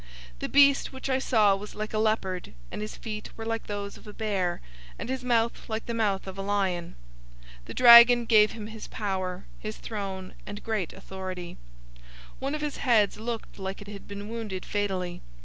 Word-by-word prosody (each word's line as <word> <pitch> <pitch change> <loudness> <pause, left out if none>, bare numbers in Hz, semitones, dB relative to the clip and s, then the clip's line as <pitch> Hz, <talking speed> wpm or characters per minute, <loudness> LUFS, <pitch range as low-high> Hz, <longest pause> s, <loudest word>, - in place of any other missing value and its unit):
013:002 - - -23
The - - -3
beast 280 -1 +5
which 265 0 -6
I 260 - +2
saw 215 -6 +4
was 205 +2 -8
like 215 +1 -4
a 215 - +1
leopard, 205 -5 0 0.2
and - - -5
his 215 - -6
feet 215 -2 -6
were 225 - -6
like 225 0 -3
those 200 -1 -4
of - - -16
a 210 - -8
bear, 195 -6 -1 0.4
and - - -6
his 260 -1 -2
mouth 235 -2 +1
like 220 0 -3
the 235 - -3
mouth 210 -4 0
of 190 0 -7
a - - -1
lion. 195 -4 -1 0.7
The - - -8
dragon 240 0 +9
gave 215 -2 +5
him 220 -2 -7
his 220 0 -8
power, 190 -3 -3
his 215 0 -5
throne, 195 -4 -5
and 205 0 -7
great 215 -7 -1
authority. 185 -2 -7 0.4
013:003 - - -21 0.3
One 275 +3 -2
of 305 - -4
his 300 -2 -3
heads 220 -5 +3
looked 225 -2 -5
like 190 0 -4
it 205 - -11
had 200 -1 -9
been 200 0 -7
wounded 215 -5 -5
fatally. 185 -4 -2
210 Hz, 200 wpm, -28 LUFS, 195-230 Hz, 0.7 s, dragon